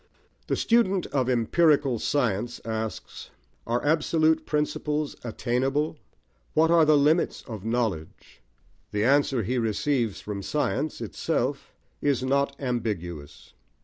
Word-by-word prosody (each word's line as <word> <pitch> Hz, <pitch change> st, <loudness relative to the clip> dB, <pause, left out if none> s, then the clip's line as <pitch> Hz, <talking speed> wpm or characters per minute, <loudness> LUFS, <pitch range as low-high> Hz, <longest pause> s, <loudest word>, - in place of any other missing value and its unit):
The -, -, +1 dB
student 195 Hz, -6 st, +2 dB
of 130 Hz, -3 st, +1 dB
empirical 135 Hz, +1 st, +3 dB
science 120 Hz, -5 st, -1 dB
asks, 110 Hz, -1 st, -5 dB, 0.4 s
Are 120 Hz, +3 st, -1 dB
absolute 160 Hz, +1 st, +2 dB
principles 150 Hz, 0 st, -1 dB
attainable? 130 Hz, +6 st, -1 dB, 0.6 s
What 160 Hz, +1 st, +4 dB
are 165 Hz, -2 st, +6 dB
the 155 Hz, -1 st, +5 dB
limits 155 Hz, +4 st, +2 dB
of 110 Hz, -6 st, -7 dB
knowledge? 110 Hz, -9 st, -3 dB, 0.5 s
The 105 Hz, 0 st, 0 dB
answer 135 Hz, -1 st, +3 dB
he 125 Hz, +5 st, -1 dB
receives 115 Hz, 0 st, 0 dB
from 105 Hz, -1 st, -5 dB
science 150 Hz, +7 st, -2 dB
itself -, -, -2 dB, 0.3 s
is 140 Hz, -3 st, +1 dB
not 140 Hz, +1 st, +1 dB
ambiguous. 100 Hz, -, -4 dB
130 Hz, 115 wpm, -26 LUFS, 115-150 Hz, 0.6 s, are